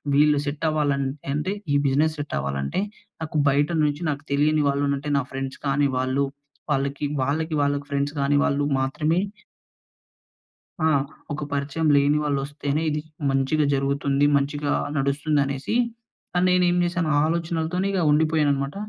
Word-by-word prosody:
వీళ్ళు 150 0 +5
సెట్ 145 +3 -3
అవ్వాలంట్ 145 -3 0 0.2
అంటే, 150 +6 -1 0.2
ఈ - - +3
బిజినెస్ 155 +4 +2
సెట్ 145 0 -4
అవ్వాలంటే, 70 - -2 0.4
నాకు 155 -1 -3
బయట 145 +2 +2
నుంచి 145 +1 0
నాకు 145 +1 -3
తెలియని 150 +1 +3
వాళ్ళు 140 +1 0
అంటే 145 +1 -4
నా 140 - -2
ఫ్రెండ్స్ 135 0 -5
కాని 140 +1 +2
వాళ్ళు. 130 +2 +1 0.5
వాళ్ళకి, 140 +1 -1 0.2
వాళ్ళకి, 160 +4 -1
వాళ్ళకి 145 0 0
ఫ్రెండ్స్ 140 +1 -1
కాని 145 +1 +2
వాళ్ళు 140 +1 +1 0.2
మాత్రమే 150 +5 0 1.7
ఆ! - - +4 0.5
ఒక 150 +1 -4
పరిచయం 145 +3 -1
లేని 140 +1 +3
వాళ్ళు 145 -2 0
వస్తేనే 145 +1 -2
ఇది 150 0 -1 0.3
మంచిగా 135 +3 +1
జరుగుతుంది, 140 +1 +1
మంచిగా 145 +1 -1 0.2
నడుస్తుంది 145 +2 +1
అనేసి, 140 +9 -3 0.6
అని 180 - +3
నేనేం 180 -1 +3
చేశాను, 175 -2 -1
ఆ - - +4
ఆలోచనలతోనే 170 +2 -1
ఇగా 190 -2 +1
ఉండిపోయాననమాట. 150 -2 +2
145 Hz, 145 wpm, -24 LUFS, 140-155 Hz, 1.7 s, వీళ్ళు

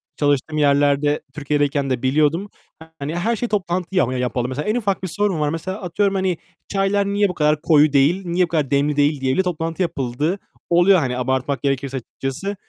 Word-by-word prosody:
çalıştığım 145 +1 0
yerlerde 145 0 +2
Türkiye'deyken 145 -1 0
de 125 -2 -1
biliyordum. 155 +8 +1 0.5
Hani, 150 +4 -4
her 225 +7 0
şeye 240 +3 -2
toplantı 185 -3 -2
ya 180 - +4
yapalım. 125 -1 -1
Mesela 145 +7 -4
en 220 - +1
ufak 200 -5 -1
bir - - -1
sorun 195 -1 -1
var. 150 -1 +1
Mesela 185 +6 -4
atıyorum, 195 +3 0
hani, 190 -3 0 0.3
"Çaylar 200 0 +1
niye 200 0 +1
bu - - -3
kadar 150 -1 +1
koyu 150 -3 +4
değil, 165 +8 +3
niye 175 +1 +1
bu - - -13
kadar 150 -5 -1
demli 140 +1 +2
değil?" 145 -1 +2
diye 130 0 +1
bile 190 - +2
toplantı 165 0 -3
yapıldığı 155 +2 -1 0.3
oluyor, 175 +2 +5
hani, 125 -3 -2
abartmak 130 +2 -1
gerekirse 135 -1 -1
açıkçası. 135 - -5
155 Hz, 190 wpm, -21 LUFS, 140-185 Hz, 0.5 s, oluyor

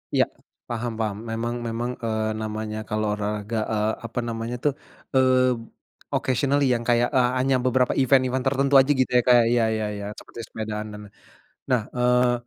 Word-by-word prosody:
Iya, - - +5 0.4
paham 120 0 -3
paham. 105 -2 -1
Memang 115 +2 -2
memang, 120 +2 -2
eee, 110 -1 -1
namanya 110 0 -4
kalau 110 0 -1
olahraga, 105 +1 -3 0.2
eee, 105 0 +1
apa 115 +2 -4
namanya 115 +1 -4
tuh, 145 -2 +2 0.4
eee, 130 -1 +4 0.6
occasionally, 140 +2 +1
yang 120 0 -1
kayak, 120 0 +3
eee, 125 -1 +4
hanya 135 +1 +2
beberapa 125 0 +2
event-event 130 0 +2
tertentu 140 +1 +1
aja, 135 - +1
gitu 130 - +2
ya, - - +5
Kak? 125 -1 +7
Iya 120 -1 +3
iya 110 -1 -1
iya, 100 0 -6
seperti - - -13
sepedaan 110 -1 -5
dan 105 - -8
lain. - - -34 0.6
Nah, 125 -3 +3 0.2
eee, 125 0 +3
120 Hz, 170 wpm, -24 LUFS, 110-130 Hz, 0.6 s, Kak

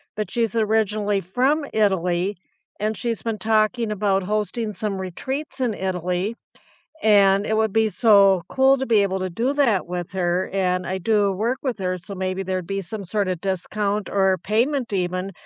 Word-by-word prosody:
but 210 -3 -3
she's 230 -2 -1
originally 210 -2 +1
from 265 - +1
Italy, 190 -2 +1 0.4
and 215 +1 -1
she's 230 -3 -3
been 225 -3 -3
talking 220 +1 +1
about 200 -2 +1
hosting 210 +2 -2
some 200 -3 -3
retreats 265 - -5
in 245 -4 0
Italy, 185 +2 -2 0.7
and 200 -2 +5
it 220 - -1
would 220 -2 +1
be 220 -1 +3
so 195 -1 +5
cool 265 0 +4
to 265 - -2
be 215 -3 +4
able 190 -1 0
to 185 - -2
do 235 +10 0
that 240 -12 +2
with 175 -1 -5
her, 180 0 0
and 180 -2 0
I 190 - -2
do 205 +1 +2
work 225 +7 -1
with 255 -6 -2
her, 185 -1 -1
so 195 +3 -9
maybe 185 0 -2
there'd 185 -2 -3
be 195 0 -2
some 200 +2 -7
sorta 185 -1 -1
discount 200 +3 -2
or 190 -2 +2
payment 240 +3 0
even 185 +1 -2
205 Hz, 175 wpm, -22 LUFS, 185-220 Hz, 0.7 s, and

